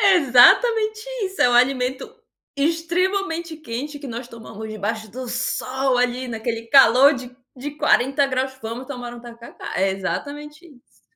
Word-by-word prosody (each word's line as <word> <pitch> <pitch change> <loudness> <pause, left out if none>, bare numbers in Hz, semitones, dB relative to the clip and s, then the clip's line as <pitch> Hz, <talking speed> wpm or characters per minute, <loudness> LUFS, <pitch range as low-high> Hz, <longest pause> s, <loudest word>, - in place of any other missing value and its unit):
Exatamente 415 - +5 0.2
isso, 380 0 -2
é - - +5
um 245 - 0
alimento 255 +1 +1 0.4
extremamente 335 +2 -1
quente 290 +1 -6
que 285 - -9
nós 240 +1 -7
tomamos 220 -2 -10
debaixo 215 0 -4
do 255 +2 -7
sol 260 +1 -1
ali 250 +1 -1
naquele 225 0 -4
calor 270 +2 +6
de 250 -1 -9 0.2
de 280 +3 -6
40 275 -1 +2
graus. 265 0 -2
Vamos 230 +3 -6
tomar 245 -3 -7
um 240 - -10
tacacá. 235 -1 -10
É 195 0 +1
exatamente 295 - -5
isso. 280 -7 -21
255 Hz, 145 wpm, -21 LUFS, 240-295 Hz, 0.4 s, calor